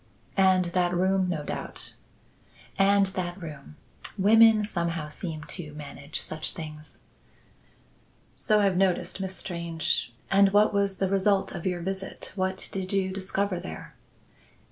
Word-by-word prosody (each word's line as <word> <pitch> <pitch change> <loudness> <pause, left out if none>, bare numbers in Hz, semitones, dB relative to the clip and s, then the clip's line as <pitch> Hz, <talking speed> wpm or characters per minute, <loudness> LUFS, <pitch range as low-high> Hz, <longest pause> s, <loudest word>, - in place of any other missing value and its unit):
"And 190 -2 +4
that 180 -1 +2
room 190 +1 +2
no 160 -4 -2
doubt." - - -3 0.8
"And 200 0 +4
that 185 -1 -4
room. 150 - -9 0.4
Women, 215 +2 +6
somehow, 170 -5 -2
seem 155 -2 -6
to 150 0 -5
manage 145 0 -7
such 155 0 -2
things." 155 -2 -9 1.4
"So 215 -1 +2
I've 195 -3 +2
noticed, 190 0 +1
Miss 190 0 -3
Strange. 170 -8 -2 0.2
And 195 0 +5
what 210 +1 +5
was 200 -1 +1
the 190 - +1
result 195 0 +2
of 175 -1 -4
your 180 -1 -1
visit? 190 +2 -5
What 190 -1 -2
did 190 -1 -3
you 190 -1 +1
discover 190 0 -1
there?" 80 - -8
185 Hz, 135 wpm, -27 LUFS, 170-195 Hz, 1.4 s, Women